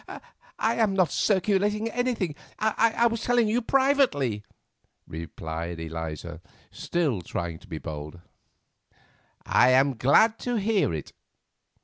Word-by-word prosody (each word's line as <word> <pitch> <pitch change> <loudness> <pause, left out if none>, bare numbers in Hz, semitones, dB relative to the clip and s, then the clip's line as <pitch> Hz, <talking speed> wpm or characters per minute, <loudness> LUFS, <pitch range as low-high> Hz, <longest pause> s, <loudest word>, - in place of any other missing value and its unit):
"I 225 +1 0
am 215 -4 +2
not 185 -4 +2
circulating 205 +2 +1
anything. 235 -8 -1 0.2
I 225 +2 +2
was 230 -1 0
telling 240 -2 +2
you 230 +3 +1
privately;" 250 - +2 0.7
replied 80 +1 -6
Eliza, 80 0 -6 0.3
still 150 - -1
trying 85 -1 -5
to - - -18
be 80 - -6
bold. 75 +1 -7 1.3
"I 125 - +4
am 135 +1 +4
glad 175 - +4
to 245 -1 -2
hear 210 - +1
it. 80 -3 -6
175 Hz, 115 wpm, -26 LUFS, -, 1.3 s, I